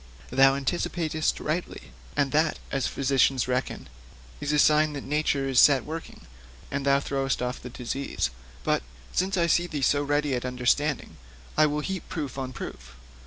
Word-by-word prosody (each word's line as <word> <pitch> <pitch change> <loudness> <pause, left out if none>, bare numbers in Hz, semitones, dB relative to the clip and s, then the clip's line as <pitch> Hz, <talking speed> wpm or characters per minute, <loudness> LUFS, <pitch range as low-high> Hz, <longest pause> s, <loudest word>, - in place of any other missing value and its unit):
'Thou 135 +1 +5
anticipatest 155 +2 -1
rightly, 165 +4 -4 0.3
and 140 -2 +2
that 155 +1 +2
as 135 -2 0
physicians 135 -2 +2
reckon 125 +1 -2 0.5
is 145 - -2
a 150 - +2
sign 150 +1 +4
that 140 - -5
nature 145 -1 0
is 130 -2 +3
set 135 -4 +6
working, 160 +2 -7 0.5
and 140 0 -2
is 140 0 +4
throwing 135 -1 -2
off 125 +1 -3
the 125 - -7
disease. 125 - -3 0.3
But, - - +1 0.3
since 190 +1 +1
I 170 - +3
see 175 +1 +2
thee 150 -5 -3
so 145 +2 +3
ready 145 0 0
at 125 - -1
understanding, 125 - 0 0.4
I 155 0 +5
will 150 0 -1
heap 190 +2 -4
proof 145 -4 -4
on 130 -1 -4
proof. 65 - -8
140 Hz, 165 wpm, -27 LUFS, 130-155 Hz, 0.5 s, set